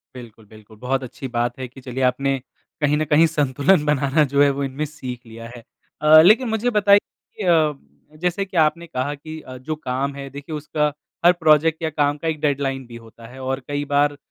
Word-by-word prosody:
बिल्कुल, 115 -3 -12
बिल्कुल। 110 +1 -17
बहुत 130 +1 -1
अच्छी 130 +2 -7
बात 120 0 -2
है 130 - -4
कि 130 +2 -15
चलिए 130 +1 -4
आपने 135 +2 +1 0.4
कहीं 150 0 +2
न 155 - 0
कहीं 150 +3 +4
संतुलन 150 +2 +2
बनाना 150 +1 +2
जो 140 - +4
है 140 - +4
वो - - -1
इनमें 135 +3 -3
सीख 130 -4 -8
लिया 115 0 -10
है। 115 - -12 0.4
अ, 155 +1 +8
लेकिन 220 +8 +5
मुझे 220 +2 0
बताइए 205 -2 +5
कि 210 - -13
अ, 160 -4 +3 0.5
जैसे 180 +2 0
कि 185 -2 -7
आपने 165 +2 +2
कहा 145 -1 -3
कि 155 +2 -9
अ, 130 0 -10
जो 155 +5 -5
काम 140 -1 -3
है 140 -1 -7
देखिए 145 +3 -8
उसका, 150 0 -1 0.3
हर 175 - +9
प्रोजेक्ट 160 -1 +3
या 160 - 0
काम 145 -1 0
का 165 - -5
एक 155 -1 -2
डेडलाइन 135 -3 -1
भी 120 - -11
होता 115 0 -13
है 130 +2 -13
और 130 +1 -2
कई 145 0 -3
बार 145 0 +1
145 Hz, 215 wpm, -21 LUFS, 130-155 Hz, 0.5 s, हर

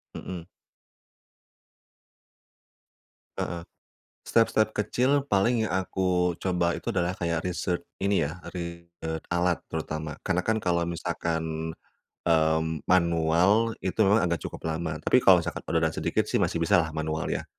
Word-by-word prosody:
Mhm. 90 -2 -7 2.9
Heeh. 85 -1 -3 0.6
Step-step 110 -1 +3
kecil 130 +6 +1
paling 110 +2 +2
yang - - -4
aku 90 -1 +1
coba 90 -2 0
itu 120 - -4
adalah 90 -2 +1
kayak 85 -2 -1
research 90 -1 -1 0.2
ini 100 -3 +2
ya, 85 - -8 0.2
research 85 -2 -6
alat 85 0 +2
terutama 80 -1 -4
karena 90 -1 0
kan 110 0 +2
kalau 85 -2 +1
misalkan, 80 -1 -3 0.5
mmm, 80 -1 +2
manual 90 +5 +3
itu 95 +3 -2
memang 105 +2 +4
agak 85 -1 -1
cukup - - -7
lama, 80 -1 -2
tapi 130 - +4
kalau 95 -2 +7
misalkan 85 - -4
udah 80 - +1
ada 80 - -1
sedikit - - 0
sih - - 0
masih - - 0
bisa 85 +1 +4
lah 80 -1 -2
manual 80 0 -2
ya. - - -2
85 Hz, 135 wpm, -27 LUFS, 80-95 Hz, 2.9 s, kalau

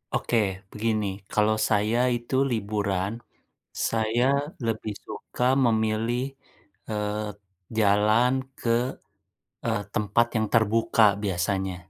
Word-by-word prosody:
Oke, 120 - 0 0.3
begini, 110 -1 0 0.2
kalau 110 0 +3
saya 110 +3 +2 0.2
itu 120 +3 -5 0.2
liburan. 100 -3 -1 0.8
Saya 115 +2 +1 0.4
lebih 110 -1 -2
suka 125 - -5 0.2
memilih, 110 +2 +1 0.7
eee, 105 0 -2 0.5
jalan 105 +4 +4 0.3
ke, 115 - -2 1.0
e - - +1 0.2
tempat 105 +3 +2
yang 110 0 +1
terbuka, 110 0 +4 0.2
biasanya. 95 0 -1
110 Hz, 90 wpm, -26 LUFS, 105-115 Hz, 1.0 s, jalan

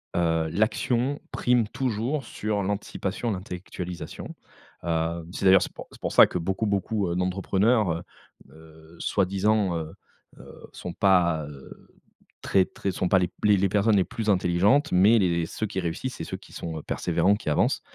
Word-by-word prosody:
heu, 80 -2 +1
l'action 120 - 0
prime 120 -3 +2
toujours 125 +3 -2
sur 105 -2 -2
l'anticipation, 100 +2 -3
l'intellectualisation, 90 -3 -6 0.5
heueu, 85 0 -1
c'est 95 - -4
d'ailleurs, 95 0 +7
c'est - - -3
pour - - -10
c'est - - -16
pour - - -3
ça - - +9
que 90 - -3
beaucoup, 95 +6 -1
beaucoup, 100 -1 0
heu, 85 - -2
d'entrepreneurs, 95 +3 +1
heu 85 +1 -3 0.5
heu, 80 +1 -17
soi-disant, 100 0 +1
heu 80 -1 -6 0.5
heu, - - -13
sont 90 - -7
pas, 90 -6 +3
heu, 70 -2 -13 0.5
très 95 -1 +3
très 100 - -4
sont 90 0 -2
pas 95 - +5
les 90 - +1
p - - -25 0.2
les 100 - +6
les 95 0 +2
personnes 105 +2 +3
les 95 - +4
plus 115 +2 -4
intelligentes, 95 - +2
mais 105 +5 +5
les 85 -3 +1
ceux 110 - -3
qui 95 - -4
réussissent 90 +9 -3
c'est - - -6
ceux - - -5
qui - - -17
sont, 80 -1 -5
heu, - - -11
persévérants, 95 +3 +1
qui 105 - -5
avancent, 75 - +1
95 Hz, 175 wpm, -26 LUFS, 85-105 Hz, 0.5 s, ça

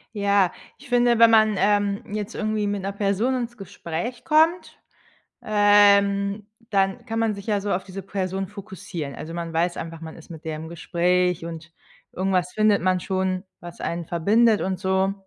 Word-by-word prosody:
Ja, 200 -2 +2 0.3
ich 280 -1 -15
finde, 240 -1 +3
wenn 230 0 +8
man, 215 -1 +4
ähm, 205 0 +1
jetzt 210 +1 -4
irgendwie 215 -1 -1
mit 205 -1 -2
'ner 195 +1 -3
Person 205 +6 0
ins 240 -1 -4
Gespräch 195 +4 -6
kommt, 320 +3 +2 0.6
ähm, 200 -1 +4 0.2
dann 195 -1 0
kann 225 -2 -3
man 225 -2 +1
sich 200 - -10
ja 205 -2 +1
so 205 0 -3
auf 180 - -1
diese 195 0 -8
Person 190 -1 -3
fokussieren. 190 -7 -7
Also, 165 +2 -8
man 170 -1 -5
weiß 175 +2 0
einfach, 165 0 -7
man 160 -1 -8
ist 165 - -14
mit 160 0 -11
der 160 - -3
im 160 +1 -8
Gespräch 175 0 0
und 165 0 -8 0.4
irgendwas 185 -1 -1
findet 215 -3 +3
man 185 0 +2
schon, 185 0 -2 0.2
was 175 0 -10
einen 170 0 -3
verbindet 210 +6 +3
und 185 -1 -2
so. 190 0 +1
195 Hz, 175 wpm, -23 LUFS, 180-210 Hz, 0.6 s, wenn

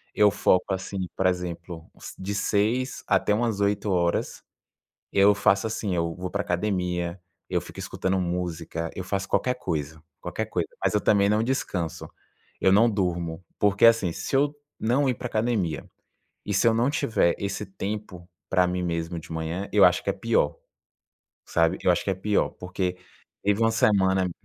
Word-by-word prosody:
eu 105 -1 +5
foco 90 +2 +2
assim, 95 0 -3
por 95 - +2
exemplo, 85 -2 -4 0.3
de 100 +2 -4
6 110 +6 0
até 105 - +2
umas 110 -2 0
8 100 0 +1
horas, 85 -2 0 0.7
eu 100 +1 +5
faço 100 0 +2
assim: 110 -3 -2
eu 85 -1 -1
vou 90 0 -5
para 100 - -2
a - - -14
academia, 90 -1 -1 0.3
eu - - +1
fico - - -12
escutando 95 0 -1
música, 85 -2 -3
eu 95 - -4
faço 95 +1 -2
qualquer 125 - +1
coisa, 80 - -4 0.2
qualquer - - -3
coisa, - - -2
mas - - +1
eu 105 - +3
também 100 -1 +3
não 105 +1 +2
descanso, 95 - -2 0.5
eu 95 - +4
não 115 +4 +6
durmo, 90 -4 -2
porque 100 +1 +3
assim, 115 -7 +4
se 135 - -2
eu 145 +2 +2 0.3
não 130 +5 +2
ir 125 - +2
para 125 - -6
a - - -5
academia 110 -9 0 0.6
e 105 - -2
se 100 +4 +3
eu 115 - +5
não 120 +4 +2
tiver 110 - +1
esse 100 +1 -3
tempo 95 -2 -6 0.2
para 90 -1 +3
mim 90 0 -1
mesmo 85 0 -2
de 80 - -13
manhã, 80 +4 -3
eu - - +6
acho - - +3
que - - -2
é - - +1
pior, 75 - +1 0.9
sabe, 85 +2 +2
eu 90 - +5
acho 90 - 0
que 100 - +1
é - - +1
pior, 105 +2 +1
porque 90 0 -3 0.5
teve 100 +2 +2
uma 115 0 +4
semana. 95 -4 +3
95 Hz, 180 wpm, -26 LUFS, 90-105 Hz, 0.9 s, não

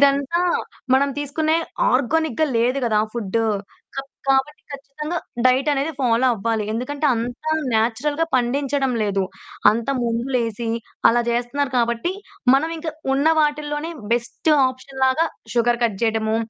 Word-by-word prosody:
ఇదంతా 280 +4 +3 0.6
మనం 280 +1 +2
తీసుకునే 310 +3 0 0.3
ఆర్గానిక్‌గా 315 +2 +1
లేదు 250 +4 +2
గదా! 215 -2 +2
ఫుడ్డు 225 0 -1 0.5
కబ్ 270 0 -5 0.2
కాబట్టి 270 +3 +1
ఖచ్చితంగా 290 +4 -5 0.3
డైట్ 255 +3 +4
అనేది 285 +3 -1
ఫాలో 245 0 +3
అవ్వాలి. 220 +1 -1
ఎందుకంటే 280 +6 -2
అంత 240 +4 -4 0.3
నేచురల్‌గా 245 +8 +1
పండించడం 270 +2 +1
లేదు. 200 -2 0 0.5
అంతా 230 +5 -1
ముందు 235 +1 -1
లేసి 230 -1 -2 0.4
అలా 240 +1 +4
జేస్తున్నారు 245 +4 -1
కాబట్టి 235 +9 0 0.4
మనం 290 +4 +2
ఇంకా 320 0 -4 0.2
ఉన్న 280 +3 +3
వాటిల్లోనే 295 +1 -1 0.2
బెస్ట్ 240 +6 0 0.2
ఆప్షన్‌లాగా 265 +3 0 0.3
షుగర్ 240 0 +2
కట్ 220 -5 +1
జేయటము, 220 -1 +1
260 Hz, 125 wpm, -22 LUFS, 235-290 Hz, 0.6 s, డైట్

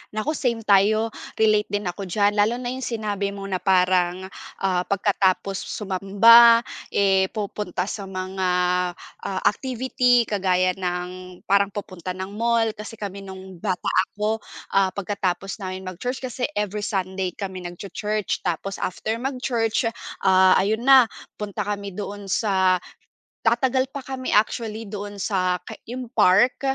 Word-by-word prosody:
Naku 215 +8 -1
same 235 -6 -1
tayo, 215 +3 +4 0.3
relate 215 -1 +3
din 205 -1 -2
ako 180 +3 -4
diyan 205 +3 +2
lalo 210 +3 +3
na 245 -1 -4
yung 260 - -6
sinabi 205 -3 -2
mo 200 0 -7
na 185 -2 -2
parang, 185 -1 +2 0.4
ah, 185 -2 +1
pagkatapos 195 -1 +1
sumamba, 225 +4 +6 0.3
eh, 195 -1 +3
pupunta 205 -4 -3
sa 200 0 -5
mga, 185 0 -3 0.8
ah, 190 -1 -2
activity 250 +1 +2
kagaya 185 -3 +1
ng 180 0 -5
parang 200 0 +3
pupunta 185 -3 -6
ng 190 +1 -5
mall. 230 0 +1
Kasi 215 +1 -9
kami 200 -1 -6
nung 190 -1 -10
bata 185 -4 -1 0.2
ako, 215 +2 -1 0.3
ah, 195 -1 +4
pagkatapos 195 0 -3
naming 185 0 -5
mag-church, 245 +10 -4
kasi 250 0 -2
every 210 0 -1
Sunday 190 -2 -2
kami 190 -2 -6
nagchu-church 205 +4 -3
tapos 180 +3 -2
after 220 +5 -2
mag-church, 250 -4 -1 0.4
ah, 185 0 +6
ayun 220 +4 +1
na 265 -2 +8 0.3
punta 210 -2 -4
kami 200 -2 -4
doon 205 0 -6
sa 190 -2 +2 0.6
tatagal 260 +3 +2
pa 275 -1 -8
kami 260 -1 -4
actually 220 +1 0
doon 205 0 -7
sa 185 -2 0
ka - - -7 0.2
yung 250 +1 -5
park, 205 +10 +4
200 Hz, 140 wpm, -23 LUFS, 190-225 Hz, 0.8 s, na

